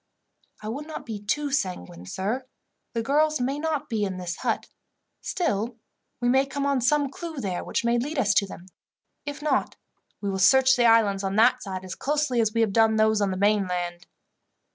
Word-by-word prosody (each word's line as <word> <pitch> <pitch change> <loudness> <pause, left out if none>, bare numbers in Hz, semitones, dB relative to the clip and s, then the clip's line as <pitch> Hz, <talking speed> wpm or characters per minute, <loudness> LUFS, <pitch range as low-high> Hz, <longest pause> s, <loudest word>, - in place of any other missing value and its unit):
"I - - -5
would 280 +7 -5
not 315 - -7
be 220 -3 -5
too 285 +8 -1
sanguine, 90 - -3
sir. 215 - -3 0.5
The 230 -1 -1
girls 305 +4 +2
may 270 +4 -1
not 310 -2 -2
be 220 -2 -1
in 190 -2 -2
this 180 -1 -4
hut, - - -1 0.6
still 235 - -1 0.4
we 240 - 0
may 265 +2 +3
come 280 +1 -3
on 280 -2 +1
some 285 +2 +2
clue 330 +1 -7
there 190 -7 -3
which - - -2
may 235 0 +2
lead 290 +6 -3
us 210 -6 +3
to 200 - +3
them. 180 -1 -10 0.6
If 290 +1 -5
not, 285 -4 0 0.4
we 200 -1 -2
will 190 - -3
search 265 +7 +6
the 245 -2 +2
islands 215 -4 +4
on 195 0 -2
that 230 +4 +4
side 190 -1 -6
as 185 - -6
closely 290 - 0
as 220 -1 +1
we 230 +1 +1
have 215 -3 +1
done 225 0 +4
those 220 -1 +3
on 200 - +2
the 185 - -3
mainland." 180 -4 0
230 Hz, 200 wpm, -25 LUFS, 195-275 Hz, 0.6 s, search